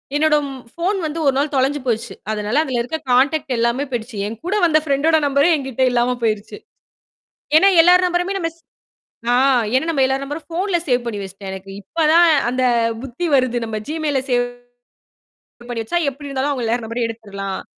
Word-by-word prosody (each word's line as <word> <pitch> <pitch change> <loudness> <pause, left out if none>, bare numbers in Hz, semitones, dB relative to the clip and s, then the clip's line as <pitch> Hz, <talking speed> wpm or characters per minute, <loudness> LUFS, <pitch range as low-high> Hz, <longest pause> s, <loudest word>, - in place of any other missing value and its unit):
என்னோட 310 +1 +3 0.4
ஃபோன் 365 +4 -1
வந்து 310 +1 -3
ஒரு 275 - +4
நாள் 285 +2 0
தொலைஞ்சு 270 +2 +1
போச்சு. 230 -3 -2 0.2
அதனால 215 +6 0
அதுல 260 -5 -2
இருக்க 250 +7 -3
கான்டெக்ட் 275 +3 +2
எல்லாமே 235 +4 +1
போயிடுச்சு. 235 -2 -4
என்கூட 230 - -4
வந்த 315 -2 +4
ஃபிரண்டோட 310 +2 +2
நம்பரே 280 +4 +3
என்கிட்ட 265 -3 -2
இல்லாம 245 +1 +1
போயிருச்சு. 215 -1 -2 1.0
ஏன்னா, 385 +5 +6
எல்லார் 360 +2 +5
நம்பரையுமே 355 +2 -1
நம்மஸ் 330 -2 -4 0.8
ஆ - - +4 0.4
ஏன்னா, 260 +4 +2
நம்ம 275 -4 +2
எல்லார் 265 +1 -1
நம்பரும் 295 +3 -7
ஃபோன்ல 355 +2 0
சேவ் 245 -2 +1
பண்ணி 215 -4 -4
வச்சிட்டேன். 195 0 -8
எனக்கு 190 0 -9
இப்ப 315 - -1
தான் 340 +1 +6 0.2
அந்தப் 240 -3 +1
புத்தி 270 +7 -4
வருது. 255 -2 +1
நம்ம 220 -1 -4
Gmail 310 -2 -2
ல - - +1
சேவ் 245 0 +2 1.4
வச்சா 225 +10 -3
எப்பிடி 285 +2 -10
இருந்தாலும் 275 +1 -1
அவுங்க 255 -4 -3
எல்லார் 235 +2 0
நம்பரையும் 230 +1 -2
எடுத்துர்லாம். 200 -4 -6
265 Hz, 170 wpm, -19 LUFS, 230-310 Hz, 1.4 s, ஏன்னா